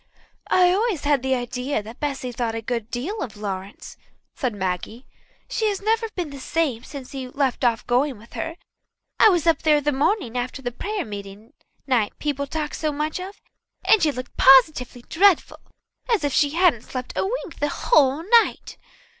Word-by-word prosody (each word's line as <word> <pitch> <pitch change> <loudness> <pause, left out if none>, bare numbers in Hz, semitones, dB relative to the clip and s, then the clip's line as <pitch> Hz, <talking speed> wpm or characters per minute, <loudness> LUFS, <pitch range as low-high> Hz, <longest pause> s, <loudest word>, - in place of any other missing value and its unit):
"I 360 -1 +5
always 400 -4 0
had 285 -3 +2
an 265 0 +1
idea 250 -1 -3
that 225 +3 -11
Bessy 270 -4 -3
thought 230 -1 -2
a 225 - -3
good 230 -1 -3
deal 315 - -4
of 215 -4 -6
Lawrence," 195 -1 -6 0.4
said 255 -7 -2
Maggie. 190 +6 -4 0.4
"She 440 - -1
has 400 - -2
never 450 +2 0
been 345 -5 -3
the 280 - -8
same 265 -5 -1
since 270 -1 -9
he 265 -2 -5
left 265 -1 -1
off 235 -2 +1
going 255 +1 +1
with 225 +3 -17
her. 325 0 -4 0.6
I 440 - +8
was 350 -5 +1
up 330 -1 +3
there 300 -1 +4
the 295 +1 0
morning 285 - 0
after 250 +2 -3
that 245 0 -5
prayer 420 -1 -2
meeting 205 +1 -9 0.3
night 245 -6 0
people 280 -1 -2
talked 300 0 -4
so 310 -1 -1
much 305 +3 -2
of, 380 +2 -8 0.5
and 420 +2 +5
she 310 - +3
looked 255 -2 -8
positively 260 -2 +5
dreadful, 385 0 +3 0.5
as 435 -8 +2
if 285 -2 0
she 290 +1 +2
hadn't 340 -10 +4
slept 255 +1 -6
a - - +1
wink 390 -3 -4
the 290 - 0
whole 285 +1 +2 0.2
night." - - -7
275 Hz, 185 wpm, -23 LUFS, 245-325 Hz, 0.6 s, I